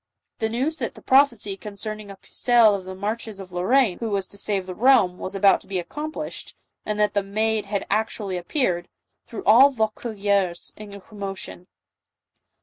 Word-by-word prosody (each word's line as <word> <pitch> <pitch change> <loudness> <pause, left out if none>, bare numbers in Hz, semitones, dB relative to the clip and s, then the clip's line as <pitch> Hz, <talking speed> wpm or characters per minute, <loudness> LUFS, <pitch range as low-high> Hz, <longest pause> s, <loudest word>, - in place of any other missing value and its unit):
The 220 - 0
news 265 +8 -1
that - - -4
the - - -13
prophecy 250 -7 +3
concerning 210 +1 -7
a 195 - -8
Pucelle 235 +2 +3
of 195 -2 -4
the 190 0 -7
marches 210 +1 -4
of 190 -1 -10
Lorraine 190 +4 +2
who 230 - -3
was 195 -2 -1
to 200 - -9
save 195 -3 -1
the 185 - -6
realm, 215 -5 +4
was 190 - -5
about 195 0 +4
to - - -18
be 195 - -2
accomplished, 300 - -6 0.3
and 210 0 -1
that 210 0 +2
the 205 - +2
Maid 215 +1 -1
had 200 -1 -2
actu 215 +1 -1
ally 195 -2 -4
appeared, 180 - -1 0.4
threw 225 - -7
all 245 +7 +8
Vaucouleurs 205 -6 -1
in 205 -1 -10
commotion. 195 -3 -7
210 Hz, 175 wpm, -24 LUFS, 195-225 Hz, 0.4 s, all